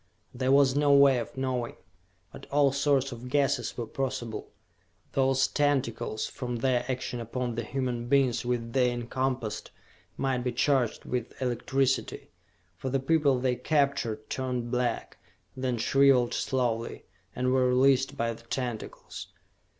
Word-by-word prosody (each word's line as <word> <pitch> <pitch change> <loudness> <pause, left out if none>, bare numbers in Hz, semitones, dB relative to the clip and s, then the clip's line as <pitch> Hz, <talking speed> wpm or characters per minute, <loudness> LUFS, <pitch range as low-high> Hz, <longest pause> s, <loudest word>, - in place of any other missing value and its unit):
There 130 +1 0
was 140 -1 +5
no 145 0 +3
way 140 -2 +6
of 120 - -7
knowing; 130 -3 -2 0.6
but - - -11
all 140 -1 +4
sorts 140 -1 +1
of 125 +1 -8
guesses 140 -1 +1
were 120 - -2
possible. 130 -2 -4 0.6
Those 135 0 +2
tentacles, 135 -6 0
from 125 -2 -5
their 125 +1 +1
action 125 -1 -3
upon 120 +1 -3
the 115 - -2
human 120 0 -3
beings 135 -2 +2
which 120 -1 0
they 125 0 +3
encompassed, 120 -1 -3 0.5
might 130 -2 0
be 125 0 -2
charged 130 -2 +1
with 125 -2 -4
electricity. 130 +2 -1 0.4
For 130 - -4
the 135 +1 +1
people 140 -1 +3
they 125 0 +1
captured 140 -7 0
turned 125 -2 -3
black, 125 -1 -2 0.4
then 130 -2 -1
shriveled 130 +1 +4
slowly 120 -3 -1 0.3
and 125 0 0
were 130 -1 +3
released 130 +1 +3
by 115 0 0
the 115 - -13
tentacles.... 120 -2 -5
130 Hz, 140 wpm, -28 LUFS, 120-135 Hz, 0.6 s, way